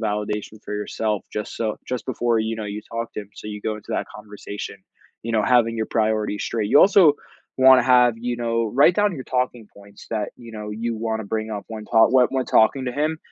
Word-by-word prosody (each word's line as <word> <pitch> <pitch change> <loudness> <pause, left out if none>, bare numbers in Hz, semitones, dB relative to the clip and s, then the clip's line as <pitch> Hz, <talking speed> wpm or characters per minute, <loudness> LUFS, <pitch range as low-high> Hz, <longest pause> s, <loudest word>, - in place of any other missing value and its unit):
validation 105 0 -3
for 105 - -6
yourself 105 0 -2
just 105 -1 -5
so 110 -2 -2
just 125 -1 -3
before, 120 -2 0
you 110 +1 -2
know, 110 - -5
you 105 +1 -5
talk 115 0 -3
to - - -3
him, 100 -1 -13
so - - -10
you 105 -1 -7
go 110 -1 -2
into 105 - -9
that - - -1
conversation, 105 -1 -8 0.5
you 115 - -4
know, 110 -2 +2
having 120 -3 +3
your 110 - -1
priorities 110 -2 0
straight. 110 -3 -2
You - - +7
also 190 -6 +6 0.5
wanna 130 -1 +8
have 125 -1 +5
you 120 +1 -3
know, 115 -1 -1
write 145 +7 +5
down 205 -1 +2
your 130 - -7
talking 125 -3 -2
points 100 0 -15
that, 110 -2 -2
you 115 -2 -12
know, 105 -1 -6
you 115 +2 -3
wanna 110 -1 -3
bring 110 +1 -3
up 105 -2 -5
when 110 -1 -8
tal 110 0 +6
when 130 -1 +6
when 130 -1 -1
talking 130 +5 +3
to 125 - -3
him 155 +3 -1
110 Hz, 225 wpm, -22 LUFS, 105-125 Hz, 0.5 s, wanna